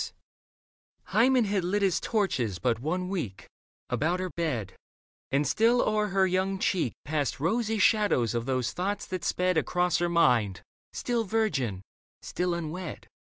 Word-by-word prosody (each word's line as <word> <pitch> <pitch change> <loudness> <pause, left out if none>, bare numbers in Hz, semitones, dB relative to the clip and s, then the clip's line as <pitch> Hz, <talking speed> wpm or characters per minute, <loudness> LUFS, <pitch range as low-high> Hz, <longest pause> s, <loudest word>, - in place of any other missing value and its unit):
Leda - - -12 1.0
Hymen 245 +1 +4
had 200 -2 0
lit 200 +4 0
his 190 -3 +2
torches 130 - 0
but 115 +2 0
one 180 +7 -2
week 160 - -4 0.4
About 170 +5 0
her 185 -1 -3
bed 125 - -2 0.6
(and 140 +2 +2
still 235 +2 +3
o'er 215 -2 +1
her 190 -1 +2
young 190 +1 0
cheek 175 -9 0
Passed 145 -3 -1
rosy 225 - 0
shadows 205 - +3
of 120 +1 -2
those 130 -2 0
thoughts 200 +3 -2
that 185 -1 -5
sped 180 -1 +1
Across 180 +1 +1
her 175 0 +1
mind, 120 - +2 0.3
still 240 -2 -1
virgin, 150 - -1 0.4
still 180 -1 -1
unwed. 170 +1 -5
180 Hz, 150 wpm, -28 LUFS, 135-200 Hz, 1.0 s, Hymen